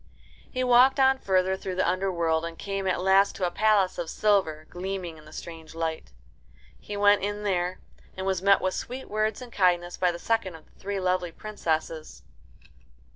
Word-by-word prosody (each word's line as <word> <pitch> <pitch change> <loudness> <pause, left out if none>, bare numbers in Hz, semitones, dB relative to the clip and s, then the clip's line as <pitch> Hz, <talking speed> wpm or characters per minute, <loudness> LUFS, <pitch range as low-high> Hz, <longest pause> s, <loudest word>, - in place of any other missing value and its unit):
He 255 -1 -2
walked 255 +2 +5
on 265 0 +4
further 190 -2 +1
through 190 -1 -5
the 185 - +1
underworld, 170 -3 0
and 165 0 -6
came 195 -1 -3
at 185 - +1
last 195 +1 +4
to 185 - -1
a 175 - -1
palace 210 -3 +2
of 170 -2 -3
silver, 190 -8 +1
gleaming 180 -3 -5
in 155 - -16
the 155 - -14
strange 160 0 -9
light. 160 - -3 0.7
He 205 - -7
went 205 0 +5
in 205 +1 -3
there, 180 -2 -1 0.4
and 190 - -4
was 190 -2 0
met 200 +1 +4
with 185 0 0
sweet 255 +2 -6
words 215 +3 -1
and 245 - -12
kindness 175 -2 +1
by 180 -1 +2
the 170 - -6
second 210 -3 -1
of 160 - -14
the - - -29
three 200 0 -3
lovely 180 -1 0
princesses. 160 -5 -4
190 Hz, 185 wpm, -27 LUFS, 175-205 Hz, 0.7 s, walked